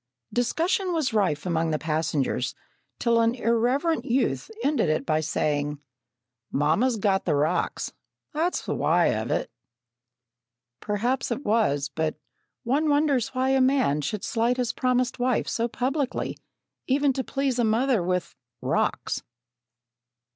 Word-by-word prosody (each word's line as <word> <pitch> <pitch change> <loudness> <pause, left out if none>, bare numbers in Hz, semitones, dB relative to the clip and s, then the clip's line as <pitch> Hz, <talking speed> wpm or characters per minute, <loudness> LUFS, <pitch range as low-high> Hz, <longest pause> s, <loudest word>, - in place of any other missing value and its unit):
Discussion 340 - +1
was 305 -7 0
rife 185 -8 +1
among 165 -2 0
the 155 - +1
passengers, 150 -5 -1 0.4
till 235 -1 +3
an 230 +1 +2
irreverent 250 +8 +1
youth 260 - 0
ended 285 - +2
it 155 - 0
by 155 -1 +2
saying: 150 -1 -1 0.7
"Mamma's 165 - +2
got 195 -2 +1
the 155 - +2
rocks; 150 +2 0 0.4
that's 330 +4 -1
the - - -1
why - - +3
of - - -3
it!" - - -1 1.3
Perhaps 240 +5 -1
it 255 +4 -3
was, 205 -11 +2
but 160 -1 -1 0.5
one 285 +6 +1
wonders 285 -4 +2
why 260 +1 +1
a 270 0 +3
man 255 - +3
should 205 +7 -3
slight 235 +2 +1
his 245 -2 0
promised 255 0 0
wife 245 -1 +1
so 230 0 0
publicly, 265 +3 -2 0.5
even 275 +1 +3
to 265 - -2
please 270 -2 -1
a - - +3
mother 230 +1 +2
with 180 0 -1 0.3
"rocks!" - - -1
235 Hz, 135 wpm, -26 LUFS, 165-265 Hz, 1.3 s, till